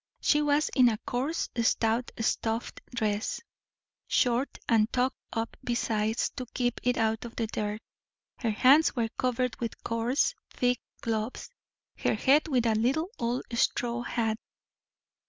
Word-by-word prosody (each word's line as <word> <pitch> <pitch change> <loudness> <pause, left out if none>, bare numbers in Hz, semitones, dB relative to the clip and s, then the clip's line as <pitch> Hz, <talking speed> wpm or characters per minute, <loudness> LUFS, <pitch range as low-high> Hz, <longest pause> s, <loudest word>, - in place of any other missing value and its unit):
She 295 - +3
was 295 0 +2
in 250 -3 +5
a 220 - -1
coarse, 275 +7 -1
stout 230 +1 +1
stuff 225 +1 0 0.2
dress, 215 -2 -1 0.7
short, 245 +2 +1
and 225 -1 +3
tucked 255 +1 0
up 225 0 -3
besides, 225 -2 0
to 255 - -4
keep 245 -2 0
it 245 0 +1
out 225 +1 +1
of 235 -1 -8
the 230 - 0
dirt. 210 0 -3 0.6
Her 230 - 0
hands 265 +8 +5
were 230 -3 0
covered 250 0 -1
with 230 -1 -5
coarse, 230 +4 +1 0.2
thick 245 0 +1 0.2
gloves, 225 - -3 0.5
her - - +1
head 285 +4 +4
with 255 -6 +1
a 225 - +3
little 270 - +1
old 240 +2 -1
straw 240 0 +1
hat. 225 -2 -1
235 Hz, 140 wpm, -29 LUFS, 225-255 Hz, 0.7 s, in